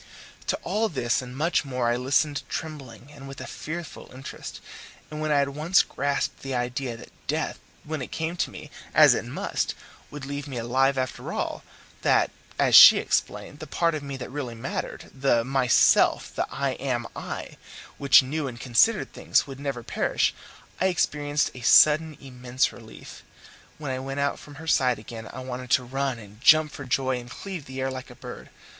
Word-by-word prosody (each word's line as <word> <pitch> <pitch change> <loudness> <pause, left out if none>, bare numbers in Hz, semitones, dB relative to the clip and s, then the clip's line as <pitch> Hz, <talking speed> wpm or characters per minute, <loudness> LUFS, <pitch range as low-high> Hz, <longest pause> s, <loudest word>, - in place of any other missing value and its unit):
To - - +1
all 215 +5 0
this 125 -6 0
and 125 0 -9
much 165 +4 +1
more 125 -3 -2
I 120 - +2
listened 140 +3 +1
trembling, 140 -2 -7
with 135 0 -9
a 130 - -6
fearful 160 +3 -7
interest, 130 +1 -8 0.5
and 155 0 -5
when 155 0 -1
I 145 - +4
had 140 0 +2
once 155 +7 +3
grasped 140 +1 -2
the 135 -1 -4
idea 125 0 -2
that - - -13 0.2
death - - -2 0.2
when 155 -1 -4
it - - -6
came 165 +2 -3
to - - 0
me, - - -11 0.2
as - - +8
it - - -2
must, - - -2 0.3
would 145 -2 -8
leave 145 +1 -5
me 135 -3 -6
alive 130 +4 +1
after 130 -1 -3
all - - -3 0.4
that, - - +3 0.3
as - - +2
she - - +11
explained, 145 - -2
the 155 - -8
part 170 +3 +1
of 155 - -3
me 140 -1 -6
that 125 - -7
really 130 -4 -5
mattered, 115 +4 -5
the 130 -3 +2
myself, 130 -1 +3
the - - -1
I 140 -1 -1
am 120 -3 -2
I, - - -6 0.4
which 140 -1 +7
knew 145 +3 -3
and 120 -2 -7
considered 130 - +2
things, - - +1
would 135 -1 -9
never 135 -4 -4
perish, - - 0 0.5
I 190 - +3
experienced 150 -4 0
a 125 - -10
sudden 155 +5 +5
immense 125 0 -2
relief. 110 -2 -12 0.6
When 145 -3 -4
I 130 - -2
went 135 +1 -5
out 140 0 0
from 145 - -13
her 160 +3 -10
side 130 -6 +3
again 110 +1 -9
I 130 - -7
wanted 130 -1 -6
to 130 - +3
run 135 0 -2
and 105 0 -14
jump 155 +2 +6
for 140 - -8
joy 130 -1 0
and 120 0 -11
cleave 180 +1 -7
the 130 0 -7
air 130 0 -1
like 130 -1 -7
a - - -12
bird. - - -10
135 Hz, 190 wpm, -26 LUFS, 125-150 Hz, 0.6 s, she